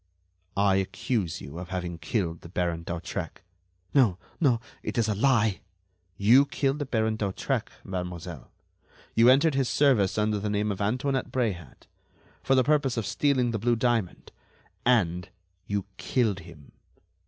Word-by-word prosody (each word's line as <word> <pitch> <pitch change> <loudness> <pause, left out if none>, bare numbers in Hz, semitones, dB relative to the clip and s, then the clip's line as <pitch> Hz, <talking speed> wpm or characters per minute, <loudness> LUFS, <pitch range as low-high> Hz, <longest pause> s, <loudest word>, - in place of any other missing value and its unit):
"I 100 -1 +4
accuse 95 - -2
you 70 +7 -8
of 90 - -8
having 90 -3 -4
killed 85 0 -2
the 85 - -11
Baron 85 -2 -1
d'Hautrec." 85 +2 -5 0.5
"No, 120 -11 +4 0.2
no, 130 -8 +3 0.2
it - - -5
is 115 -2 +2
a 105 - +1
lie." 110 -2 +2 0.6
"You 125 +8 +6
killed 140 +1 0
the 145 - -3
Baron 110 -3 0
d'Hautrec, 100 -3 -2
mademoiselle. 90 -5 -6 0.6
You 115 +2 +6
entered 140 +4 +5
his 135 -2 +1
service 125 -11 +3
under 105 0 +1
the 105 +1 -2
name 105 +1 0
of 100 - -4
Antoinette 130 +6 -1
Bréhat, 95 - -3 0.6
for 135 - +2
the 130 - +5
purpose 145 -3 +1
of 115 - -1
stealing 130 -2 +1
the 110 - -2
blue 120 +3 +2
diamond 115 -5 -1 0.6
and 90 -8 +2 0.4
you 100 -2 -1
killed 110 -7 0
him." 80 -5 -14
105 Hz, 150 wpm, -27 LUFS, 90-125 Hz, 0.6 s, You